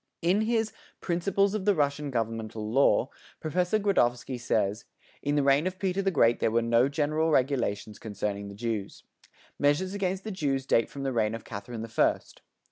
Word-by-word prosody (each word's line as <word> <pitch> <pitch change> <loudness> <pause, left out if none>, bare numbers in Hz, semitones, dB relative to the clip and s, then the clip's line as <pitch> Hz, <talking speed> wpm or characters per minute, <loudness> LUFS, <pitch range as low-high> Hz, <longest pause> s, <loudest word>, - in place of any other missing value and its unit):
In 185 +5 +3
his 225 0 0 0.3
"Principles 195 +3 +1
of 210 -3 -2
the 205 -1 +4
Russian 145 -1 0
Governmental 115 -3 -3
Law" 135 0 +3 0.3
Professor 180 +5 0
Gradovsky 125 - +1
says: 105 -3 0 0.4
"In 145 +1 0
the 145 - +2
reign 140 +5 +3
of 185 0 -4
Peter 190 0 0
the 195 - +1
Great 120 -9 +3
there - - +2
were 115 +1 +1
no 115 +3 +3
general 155 +2 0
regulations 125 -7 0
concerning 100 -1 -4
the 100 - -9
Jews." 110 -2 -4 0.6
Measures 150 +7 +2
against 190 -1 -2
the 220 - -5
Jews 140 -8 -1
date 115 -4 +2
from 140 - -7
the 135 -1 -1
reign 110 -1 +1
of 115 - -9
Catherine 110 +2 -6
the - - -5
First. 115 - 0
140 Hz, 180 wpm, -28 LUFS, 115-180 Hz, 0.6 s, the